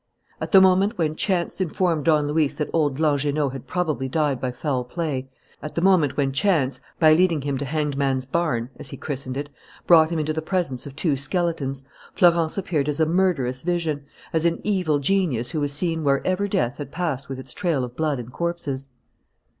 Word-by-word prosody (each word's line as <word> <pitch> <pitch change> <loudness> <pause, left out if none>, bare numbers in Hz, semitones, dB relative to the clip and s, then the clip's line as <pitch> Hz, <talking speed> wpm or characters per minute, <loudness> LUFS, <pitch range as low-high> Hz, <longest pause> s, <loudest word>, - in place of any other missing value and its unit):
At - - -4
the 195 - +9
moment 190 +4 +4
when 155 -3 0
chance 185 +1 0
informed 170 -4 0
Don 150 -3 +3
Luis 150 -1 +1
that 150 - -3
old 145 -5 +1
Langernault 145 -2 +1
had 135 - -8
probably 155 -8 -1
died 145 -3 0
by 130 - -1
foul 130 0 -2
play, 135 -2 -3 0.3
at 150 - -7
the 170 - 0
moment 175 -7 +3
when 140 -2 +1
chance, 140 -4 +1 0.2
by 155 -2 +6
leading 165 -2 +3
him 140 -1 -1
to 140 - -3
Hanged 150 -1 -1
Man's 135 -2 0
Barn, 135 -5 -1
as - - -4
he - - -7
christened 135 -3 -4
it, 145 +1 -5 0.3
brought 160 -2 +6
him 170 - -2
into 155 0 -1
the 160 - -2
presence 160 -7 -2
of 140 - -10
two 155 -2 +1
skeletons, 140 -2 -1 0.3
Florence 170 -2 +3
appeared 155 -7 -1
as 150 - -2
a 160 - +4
murderous 155 -8 +1
vision, 165 -4 -1 0.3
as 160 -1 +1
an 170 0 +1
evil 180 -8 +1
genius 140 -6 0
who 155 -3 -2
was 145 -1 0
seen 165 +2 -1
wherever 185 +8 +1
death 125 -6 -1
had 145 -1 -6
passed 150 -6 -3
with 135 - -4
its 130 -1 -9
trail 170 -9 0
of 125 0 -6
blood 155 -2 0
and 125 0 -8
corpses. 160 -6 -3
150 Hz, 200 wpm, -23 LUFS, 135-170 Hz, 0.3 s, the